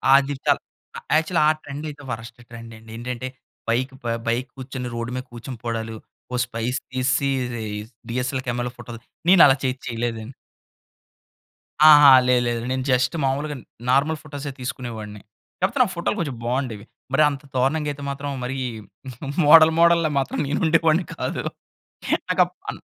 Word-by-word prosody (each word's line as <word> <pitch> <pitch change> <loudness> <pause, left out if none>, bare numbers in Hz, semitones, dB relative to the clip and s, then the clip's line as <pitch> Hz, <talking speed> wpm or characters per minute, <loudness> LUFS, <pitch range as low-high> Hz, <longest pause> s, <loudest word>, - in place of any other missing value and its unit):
అది 140 +1 +3
తప్ - - +3 0.6
యాక్చువల్‌గా 160 +1 +1
ఆ - - +6
ట్రెండ్ 145 +2 -7
అయితే 145 -1 -10
వర్స్ట్ 115 +1 -7
ట్రెండ్ 115 -1 -10
అండి. 110 0 -14
ఏంటంటే, 125 +1 -4 0.4
బైక్ 130 +4 0
ప - - -17 0.2
బైక్ 120 +3 0
కూర్చొని 130 -1 -5
రోడ్డు 115 +1 -4
మీద 130 - -3
కూర్చొనిపోవడాలు. 115 -2 -5 0.4
ఒక 125 - -1
స్పైక్స్ 120 +2 -3
తీసిసి 130 +2 +1 0.8
డీఎస్ఎల్ 130 +2 -2
కెమెరాలో 120 0 -2
ఫోటోస్ 120 -1 -9 0.3
నేను 185 -1 +7
అలా 135 - +5
చే 130 - +2 0.2
చేయలేదండి. 115 0 -3 1.6
ఆహా! 145 -2 +9 0.2
లేదు 125 -1 +4
లేదు. 120 -1 -1
నేను 130 0 -1
జస్ట్ 130 +3 +2
మాములుగా 145 +3 -1 0.3
నార్మల్ 145 +4 +2
ఫోటోసే 145 -1 -6
తీసుకునేవాడిని. 115 -4 -6 0.4
కాకపోతే 195 +9 +1
ఆ - - -3
ఫోటోలు 170 +5 -1
కొంచెం 145 -8 -3
బాగుండేవి. 120 -4 -2 0.3
మరి 155 +3 +5
అంత 140 0 -6
దారుణంగా 145 +4 +1
అయితే 145 0 -8
మాత్రం 140 +1 -4
మరి 130 +2 -3 0.9
మోడల్ 160 +2 +8
మోడల్‌లా 170 -1 +5
మాత్రం 135 - -2
నేను 145 - -1
ఉండేవాడిని 165 +2 +3
కాదు. - - -3 0.9
నాకు - - +3
అప్ - - -16 0.2
అన్ - - -11
130 Hz, 145 wpm, -23 LUFS, 120-145 Hz, 1.6 s, ఆహా